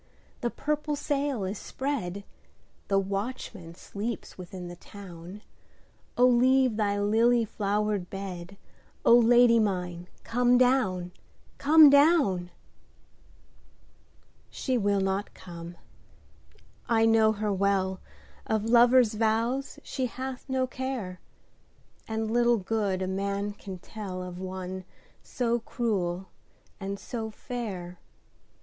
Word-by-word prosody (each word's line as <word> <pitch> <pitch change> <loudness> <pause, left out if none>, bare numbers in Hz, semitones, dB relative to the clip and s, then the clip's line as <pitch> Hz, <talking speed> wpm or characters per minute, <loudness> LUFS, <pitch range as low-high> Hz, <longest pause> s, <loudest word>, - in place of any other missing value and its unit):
the 240 - -1
purple 300 +3 -2
sail 285 -5 -1
is 190 +2 -3
spread, 215 -9 -3 0.6
The 195 - +2
watchman 195 -3 -4
sleeps 215 +5 -6
within 180 0 -8
the 175 - -8
town,O 195 +6 -6
leave 255 0 +4
thy 205 -2 0
lily 230 +3 +3
flowered 205 -2 -1
bed,O 195 +4 -2
Lady 240 0 +6
mine 180 -4 -2 0.2
come 245 +1 +3
down, 230 -9 +2 0.5
come 300 0 +8
down! 280 - +4 2.0
She 260 - -2
will 200 -3 +2
not 195 +2 -2
come, 170 -1 -10 1.1
I 225 -1 +4
know 220 -1 +4
her 210 -1 -1
well, 190 -1 +1 0.5
Of 220 -1 0
lover's 240 0 +5
vows 230 +6 0
she 260 -2 -2
hath 260 +2 -7
no 260 -1 +1
care, 255 -8 -5 0.9
And 220 0 -2
little 240 0 +3
good 200 -2 -1
a - - -2
man 200 +2 -2
can 195 -2 -8
tellOf 185 -2 -7
one 185 0 -5 0.4
so 240 -1 -1
cruel 195 -7 -2 0.5
and 195 0 -4
so 225 -2 -5
fair. 205 -7 -6
210 Hz, 105 wpm, -28 LUFS, 190-245 Hz, 2.0 s, come